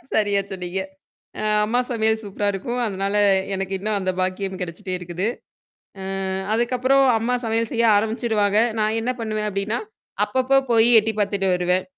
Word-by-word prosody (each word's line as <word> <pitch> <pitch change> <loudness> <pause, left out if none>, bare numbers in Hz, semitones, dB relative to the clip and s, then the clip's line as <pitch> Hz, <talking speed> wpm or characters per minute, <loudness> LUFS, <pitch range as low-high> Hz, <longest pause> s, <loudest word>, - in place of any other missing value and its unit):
சரியா 205 -2 +2
சொன்னீங்க. 185 0 -3 0.8
அம்மா 235 +3 0
சமையல் 220 -1 +1
சூப்பரா 205 0 -2
இருக்கும். 240 +6 -4
அதனால 200 0 -2 0.4
எனக்கு 195 0 -3
இன்னும் 210 +1 -1
அந்த 185 -1 -1
பாக்கியம் 185 +1 -2
கிடைச்சிட்டே 185 +2 -5
இருக்குது. 175 +3 -4 0.8
அ - - -5 0.5
அதுக்கப்புறம் 255 +3 +2
அம்மா 245 +3 0
சமையல் 225 0 0
செய்ய 235 -1 +1
ஆரம்பிச்சிருவாங்க. 215 -1 +1 0.2
நான் 215 +1 +1
என்ன 250 - -1
பண்ணுவேன் 215 -1 -2
அப்படின்னா, 200 +3 -2 0.5
அப்பப்போ 260 +1 +2
போய் 225 +1 +5
எட்டி 220 +1 -2
பார்த்துட்டு 200 -1 0
வருவேன். 180 +1 +1
210 Hz, 140 wpm, -22 LUFS, 195-225 Hz, 0.8 s, போய்